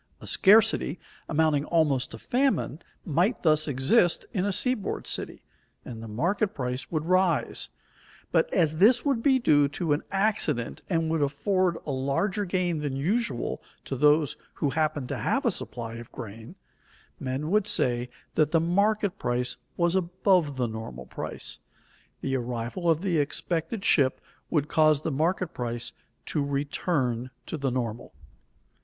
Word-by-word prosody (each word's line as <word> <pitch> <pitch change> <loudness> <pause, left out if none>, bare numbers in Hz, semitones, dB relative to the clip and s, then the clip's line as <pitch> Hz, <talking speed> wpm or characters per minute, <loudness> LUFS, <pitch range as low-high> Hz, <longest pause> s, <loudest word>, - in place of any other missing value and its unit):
A - - -11
scarcity 215 -1 +4 0.3
amounting 155 -2 +2
almost 145 -6 +2
to 115 - -9
famine 250 - 0 0.3
might 175 - +1
thus 155 -2 +3
exist 145 - +3
in 190 -3 0
a 205 - +1
seaboard 215 +1 0
city, - - -3 0.4
and 115 -2 -7
the 115 - -7
market 175 - 0
price 125 -1 -3
would 155 -2 -2
rise; 185 - +1 0.6
but - - +2
as 155 -1 +2
this 230 - +5
would 275 -5 +1
be 265 +1 +4
due 145 - +4
to 150 +2 -1
an 145 - 0
accident 195 - 0
and 165 -3 0
would 160 -2 +1
afford 170 +5 +1
a 145 - -3
larger 140 +10 0
gain 175 -3 0
than 145 -3 -3
usual 175 - -1 0.2
to - - -3
those 150 +2 +3 0.2
who 145 - 0
happened 155 -3 -1
to - - -3
have - - 0
a - - +4
supply 115 -2 -4
of 120 -1 -10
grain, 115 - -9 0.6
men 135 +5 -3
would 210 0 +2
say 120 -8 +2 0.2
that 155 -2 +3
the 165 - +3
market 200 +4 +1
price 125 0 -1 0.2
was 170 +1 +2
above 180 -4 +1
the 125 - +1
normal 110 - -7
price. - - -4 0.6
The 135 0 -1
arrival 125 +8 -3
of 165 0 +3
the 175 -5 +1
expected 170 +7 -2
ship 130 -3 +3 0.3
would 150 -3 +1
cause 155 -2 +3
the 160 - -2
market 165 +5 0
price 120 -1 -4 0.3
to 150 - -1
return 140 -3 -1 0.2
to - - -4
the 140 -3 -1
normal. 120 -3 -4
155 Hz, 155 wpm, -27 LUFS, 130-185 Hz, 0.6 s, this